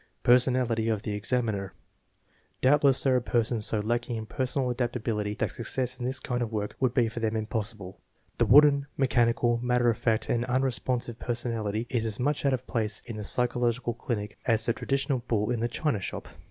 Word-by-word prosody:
Personality 120 -2 +3
of 110 -2 -1
the 105 - -3
examiner. 105 -3 -2 0.8
Doubtless 140 0 +4
there 130 -2 +3
are - - 0
persons 115 -2 0
so 110 - 0
lacking 120 +2 -1
in 110 -1 -4
personal 130 +2 -1
adaptability 115 -4 -2
that - - -1
success 125 +2 -1
in 120 - -3
this 130 +1 0
kind 125 -1 -3
of 115 -2 -2
work 105 -2 -3
would 130 -2 +1
be 120 -3 +3
for 115 +2 -5
them 110 -1 -1
impossible. 110 -3 -4 0.4
The - - +3
wooden, 145 -1 +6
mechanical, 120 -2 +2
matter 125 -1 +2
of 115 - -4
fact 110 -2 0
and 120 0 0
unresponsive 125 -2 -1
personality 115 -3 -2
is 115 -3 -1
as 105 -2 -4
much 145 +2 0
out 135 - +2
of 130 0 -3
place 110 -3 -2
in 115 -3 -7
the 105 - -5
psychological 120 +1 0
clinic 105 -3 -4
as 115 -2 +3
the 115 - +2
traditional 135 +1 -1
bull 105 0 0
in 120 - -1
the 120 - 0
china 120 -1 -1
shop. - - -5
120 Hz, 190 wpm, -28 LUFS, 110-125 Hz, 0.8 s, wooden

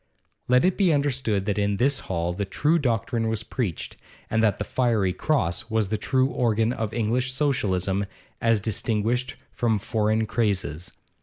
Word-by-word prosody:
Let 125 +3 +4
it 185 - +2
be 190 -4 +4
understood 130 -9 0
that 105 0 0
in 100 0 +1
this 135 +4 +2
hall 85 -1 -1
the 100 +3 -2
true 150 - +1
doctrine 115 -3 0
was 110 0 -1
preached, 110 - -4 0.3
and 110 - +2
that 110 -2 +2
the - - -2
'Fiery 110 -5 +1
Cross' 95 - -1
was 110 -3 0
the 110 - 0
true 130 +3 +2
organ 115 -2 +1
of 110 -4 -3
English 120 +3 0
Socialism 100 - 0 0.3
as 115 -2 +3
distinguished 115 +4 -1 0.2
from 115 -3 +1
foreign 110 +2 0
crazes. 95 -7 -1
110 Hz, 160 wpm, -25 LUFS, 100-125 Hz, 0.3 s, Let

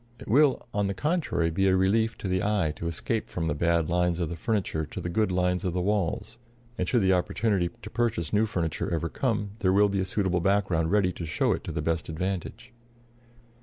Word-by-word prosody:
It - - -11
will, 140 +2 +3
on 100 -1 +1
the 100 - -2
contrary, 150 - 0
be 95 +4 +1
a 95 - +4
relief 110 +4 +2
to - - -5
the 95 0 0
eye 100 -7 +1
to 85 - -4
escape 105 +7 -2
from 80 - -3
the 75 - +1
bad 85 +1 +1
lines 90 0 +1
of 85 -3 -1
the 85 - -4
furniture 95 -4 -1
to 75 - -7
the 85 - -4
good 105 +1 +1
lines 90 +1 +1
of 90 -3 -1
the 90 - 0
walls; 105 +3 -1 0.4
and 90 -5 -2
should 120 -5 +2
the 95 0 +4
opportunity 95 0 +1
to 105 - -7
purchase 115 -10 -1
new 110 +2 +3
furniture 85 -8 -2
ever 85 0 -1
come, 105 - -1
there 95 -4 +2
will 100 +2 +4
be 100 -1 -1
a 95 - 0
suitable 95 -2 0
background 95 -4 +1
ready 100 -1 +3
to 85 - -6
show 80 - +1
it - - -5
to - - -4
the 75 -1 -3
best 80 +1 -1
advantage. 95 +8 -4
95 Hz, 225 wpm, -27 LUFS, 85-105 Hz, 0.4 s, a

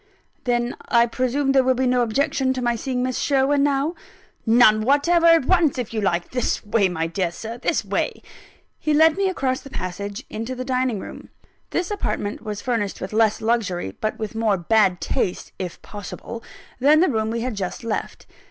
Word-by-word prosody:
"Then 240 0 0
I 235 -1 +4
presume 255 +3 0
there 270 -1 +4
will 260 0 +2
be 260 +1 0
no 250 0 +3
objection 260 +2 +1
to 255 - -4
my 240 -1 +1
seeing 250 +1 -2
Miss 255 -1 -1
Sherwin 275 0 +2
now?" 285 +3 +1 0.5
"None 225 -2 +6
whatever 290 +8 +3
at 330 -5 +6
once, 340 -6 +3
if 245 -3 -4
you 220 - -1
like. 175 -3 0
This 250 -3 -1
way, 205 -2 +2
my 165 -2 -2
dear 170 +2 -1
Sir; 225 +6 -7
this - - 0
way," - - 0
and - - -20 0.6
he 305 -1 +1
led 320 +1 +5
me 390 0 +1
across 265 -8 -1
the 275 - -11
passage, 200 -1 -5
into 225 +4 -5
the 255 0 -5
dining 255 -4 0
room. - - -9 0.4
This 355 +3 -2
apartment 210 - -2
was 210 -2 -5
furnished 230 -6 -2
with 190 +3 -6
less 220 -1 +2
luxury, 205 - -1
but 215 - -1
with 215 -2 -5
more 220 -3 +1
bad 185 0 +2
taste 180 - -2
(if 180 -3 -5
possible) 215 +3 -8 0.4
than 295 +4 +5
the 370 - +4
room 220 -5 0
we 230 +1 -2
had 250 0 -2
just 195 -1 -4
left. 230 -2 -4
240 Hz, 195 wpm, -22 LUFS, 210-270 Hz, 0.6 s, None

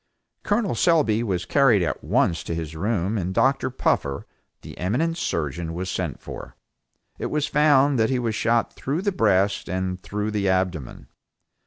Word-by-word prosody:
Col. 205 0 0
Selby 150 -11 +3
was 95 -6 -2
carried 125 -8 +4
at - - -3
once 85 - +1
to 85 - -4
his 80 -1 -5
room 100 +3 -1
and 95 +1 -3
Dr. 135 0 +2
Puffer, 70 - -1 0.4
the - - -10
eminent 130 - 0
surgeon 80 - -3
was 90 +1 -3
sent - - -3
for. - - -9 0.6
It - - -2
was 150 -1 0
found 145 -3 +3
that 110 - +3
he 130 - +1
was 115 -3 -1
shot 115 +1 +1
through 150 +7 -3
the 200 - +1
breast 100 - +1
and 90 0 -2
through 105 +2 -3
the 100 -2 0
abdomen. 90 -8 -2
105 Hz, 165 wpm, -24 LUFS, 90-135 Hz, 0.6 s, carried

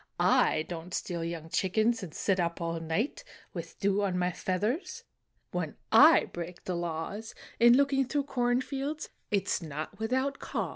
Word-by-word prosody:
I 155 - +4
don 170 +1 -7
t - - -4
steal 170 -2 -3
young 165 -1 -4
chickens 220 +7 +1
And 180 -5 -6
sit 190 +4 0
up 170 -1 -1
all 165 -1 -2
night, 165 - -2 0.3
With - - -7
dew 200 0 +2
on 190 -3 0
my 180 0 +1
feathers; 225 - -2 0.5
When - - -3 0.2
I - - +8
break 175 +1 -7
the 185 - -3
laws 175 +6 -4 0.2
In 235 +1 +7
looking 275 -2 +3
through 285 +1 0
corn 245 -2 +1
fields 280 +3 -4 0.2
It 200 -2 +1
s - - 0
not 155 +2 -6
without 260 +5 0
caws." - - -3
195 Hz, 175 wpm, -30 LUFS, 170-250 Hz, 0.5 s, I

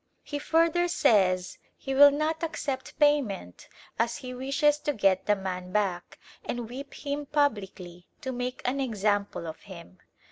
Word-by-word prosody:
He 290 - -4
further 330 +3 +2
says 185 - +2 0.2
he 270 - -4
will 285 +2 +9
not 305 +3 -1
accept 295 -5 -4
payment, 270 - +1 0.3
as 230 +1 +1
he 255 -3 -7
wishes 275 +3 +1
to 295 0 -1
get 195 -5 +2
the 210 - +4
man 185 -2 -5
back 185 -4 -1 0.3
and 240 -2 -4
whip 270 +4 -8
him 285 0 -3
publicly 195 - -2
to 260 - -3
make 250 0 -4
an 260 +3 0
example 205 -7 -1
of 160 -1 -7
him. 185 -2 -13
250 Hz, 150 wpm, -28 LUFS, 195-285 Hz, 0.3 s, will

